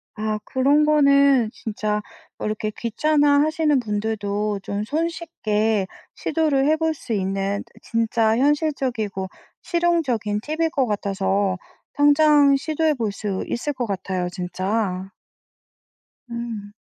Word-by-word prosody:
아. 215 Hz, -1 st, -2 dB
그런 285 Hz, +3 st, +3 dB
거는 280 Hz, -5 st, +4 dB
진짜 210 Hz, -1 st, -2 dB, 0.4 s
어 -, -, -5 dB
이렇게 215 Hz, 0 st, -2 dB
귀찮아하시는 295 Hz, +4 st, +2 dB
분들도 210 Hz, -2 st, -2 dB
좀 200 Hz, +2 st, -3 dB
손쉽게 225 Hz, -, -1 dB, 0.3 s
시도를 300 Hz, -4 st, +1 dB
해 310 Hz, -, +4 dB
볼 320 Hz, 0 st, 0 dB
수 255 Hz, -5 st, -6 dB
있는 195 Hz, 0 st, -1 dB
트 -, -, -27 dB
진짜 225 Hz, -1 st, +1 dB
현실적이고 260 Hz, -9 st, 0 dB, 0.4 s
실용적인 295 Hz, -, 0 dB
팁일 320 Hz, +3 st, -1 dB
것 265 Hz, -2 st, +1 dB
같아서 200 Hz, -2 st, 0 dB, 0.4 s
당장 290 Hz, -1 st, +5 dB
시도해 310 Hz, +1 st, 0 dB
볼 225 Hz, -4 st, -1 dB
수 200 Hz, -1 st, -3 dB
있을 285 Hz, +5 st, -2 dB
것 250 Hz, -2 st, -2 dB
같아요 185 Hz, -2 st, -2 dB
진짜. 185 Hz, +1 st, -2 dB, 1.2 s
음. 230 Hz, -3 st, -6 dB
230 Hz, 235 characters per minute, -22 LUFS, 205-295 Hz, 1.2 s, 당장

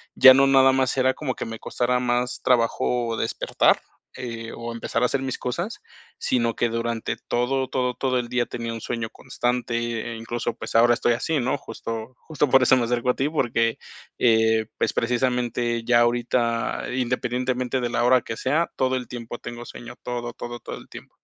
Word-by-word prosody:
ya 130 Hz, 0 st, +10 dB
no 135 Hz, +1 st, +5 dB
nada 135 Hz, -1 st, +6 dB
más 130 Hz, -1 st, +1 dB
era 130 Hz, 0 st, +3 dB
como 130 Hz, -3 st, -3 dB
que -, -, -4 dB
me 115 Hz, -1 st, -6 dB
costara 125 Hz, +1 st, 0 dB
más 125 Hz, 0 st, -1 dB
trabajo 120 Hz, -1 st, +1 dB
despertar, 115 Hz, -, +2 dB, 0.4 s
eh, 115 Hz, -2 st, -6 dB
o 115 Hz, 0 st, -6 dB
empezar 115 Hz, 0 st, -2 dB
a 125 Hz, -, +4 dB
hacer 135 Hz, +1 st, -1 dB
mis 130 Hz, -1 st, -3 dB
cosas, 175 Hz, -, -4 dB, 0.4 s
sino 120 Hz, -2 st, +1 dB
que 120 Hz, -, +1 dB
durante 115 Hz, 0 st, -2 dB
todo, 130 Hz, +2 st, 0 dB
todo, 125 Hz, -1 st, -1 dB
todo 130 Hz, -2 st, 0 dB
el 120 Hz, -1 st, -4 dB
día 125 Hz, 0 st, +1 dB
tenía 115 Hz, -1 st, -5 dB
un 115 Hz, -, -5 dB
sueño 115 Hz, -2 st, -3 dB
constante, 120 Hz, -1 st, -2 dB
incluso 115 Hz, +1 st, -3 dB
pues -, -, -7 dB
ahora 120 Hz, +1 st, +6 dB
estoy 120 Hz, 0 st, +2 dB
así, 145 Hz, +6 st, -1 dB
¿no? 130 Hz, +2 st, 0 dB
Justo 115 Hz, -1 st, -6 dB
justo 150 Hz, -2 st, +1 dB
por 135 Hz, 0 st, +5 dB
eso 130 Hz, +1 st, +5 dB
me 120 Hz, -, +1 dB
acerco 120 Hz, +1 st, 0 dB
a -, -, +3 dB
ti 135 Hz, -, 0 dB
porque, 115 Hz, -6 st, 0 dB, 0.4 s
eh, 110 Hz, -2 st, +3 dB
pues -, -, 0 dB
precisamente 120 Hz, -1 st, 0 dB
ya 120 Hz, 0 st, +4 dB
ahorita, 120 Hz, -1 st, 0 dB
independientemente 125 Hz, 0 st, -1 dB
de 120 Hz, -, -1 dB
la 120 Hz, -, 0 dB
hora 125 Hz, 0 st, +5 dB
que 115 Hz, -, -6 dB
sea, 155 Hz, +6 st, +1 dB
todo 130 Hz, 0 st, +1 dB
el 125 Hz, -, -6 dB
tiempo 120 Hz, -1 st, -7 dB
tengo 120 Hz, 0 st, -7 dB
sueño, 120 Hz, 0 st, -10 dB
todo, 120 Hz, -1 st, -4 dB
todo, 120 Hz, 0 st, -7 dB
todo -, -, -7 dB
el -, -, -13 dB
tiempo. -, -, -11 dB
120 Hz, 190 wpm, -24 LUFS, 115-130 Hz, 0.4 s, ya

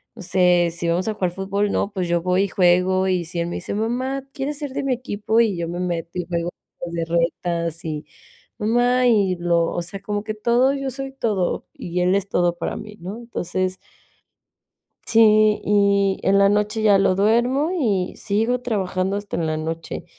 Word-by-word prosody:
no 230 Hz, -, -10 dB
sé, 180 Hz, -1 st, +3 dB
si 170 Hz, 0 st, -2 dB
vamos 175 Hz, +5 st, 0 dB
a 220 Hz, -, 0 dB
jugar 185 Hz, -3 st, -1 dB
fútbol, 195 Hz, +2 st, -1 dB
¿no?, 200 Hz, -, -1 dB
pues, 185 Hz, -3 st, -2 dB
yo 170 Hz, 0 st, +1 dB
voy 180 Hz, +1 st, +2 dB
y -, -, 0 dB
juego, 185 Hz, +1 st, +3 dB
y 185 Hz, -2 st, +1 dB
si 170 Hz, +1 st, -5 dB
él 170 Hz, -, -2 dB
me 175 Hz, -, -4 dB
dice: -, -, -5 dB
"Mamá, 255 Hz, +5 st, -2 dB
¿quieres 285 Hz, +1 st, -3 dB
ser 290 Hz, -3 st, -5 dB
de -, -, -2 dB
mi 275 Hz, -, -1 dB
equipo?" 225 Hz, -2 st, -1 dB
Y 220 Hz, -4 st, +1 dB
yo 170 Hz, 0 st, -2 dB
me 175 Hz, +1 st, -4 dB
meto 170 Hz, -2 st, -2 dB
y 175 Hz, -, -3 dB
juego 170 Hz, -1 st, -2 dB, 0.4 s
las 165 Hz, -1 st, -2 dB
retas 170 Hz, -1 st, -1 dB
y 155 Hz, -1 st, -4 dB, 0.5 s
mamá 245 Hz, +3 st, +2 dB
y 200 Hz, -6 st, +3 dB
lo 170 Hz, -1 st, +1 dB
o 175 Hz, -, -2 dB
sea, 195 Hz, +3 st, -7 dB
como 205 Hz, 0 st, -3 dB
que 215 Hz, -, -4 dB
todo, 240 Hz, +5 st, +2 dB
yo 275 Hz, -1 st, -3 dB
soy 270 Hz, +1 st, -5 dB
todo, 210 Hz, -9 st, -1 dB
y 180 Hz, +1 st, -3 dB
él 180 Hz, +1 st, +3 dB
es 200 Hz, -1 st, -1 dB
todo 175 Hz, -2 st, +1 dB
para 170 Hz, -, -3 dB
mí, 210 Hz, -1 st, -10 dB
¿no? 190 Hz, +5 st, -6 dB
Entonces 185 Hz, -5 st, -3 dB, 1.3 s
sí, 215 Hz, -2 st, +5 dB
y 200 Hz, -1 st, +2 dB
en 195 Hz, +1 st, +3 dB
la 200 Hz, 0 st, +5 dB
noche 210 Hz, +2 st, 0 dB
ya 205 Hz, -2 st, +5 dB
lo 195 Hz, -1 st, +3 dB
duermo 240 Hz, -, +2 dB
y 205 Hz, -, 0 dB
sigo 225 Hz, +4 st, 0 dB
trabajando 195 Hz, -5 st, -1 dB
hasta 205 Hz, -3 st, -4 dB
en 165 Hz, -1 st, -1 dB
la 155 Hz, 0 st, -1 dB
noche. 160 Hz, +1 st, -5 dB
195 Hz, 200 wpm, -22 LUFS, 175-220 Hz, 1.3 s, sí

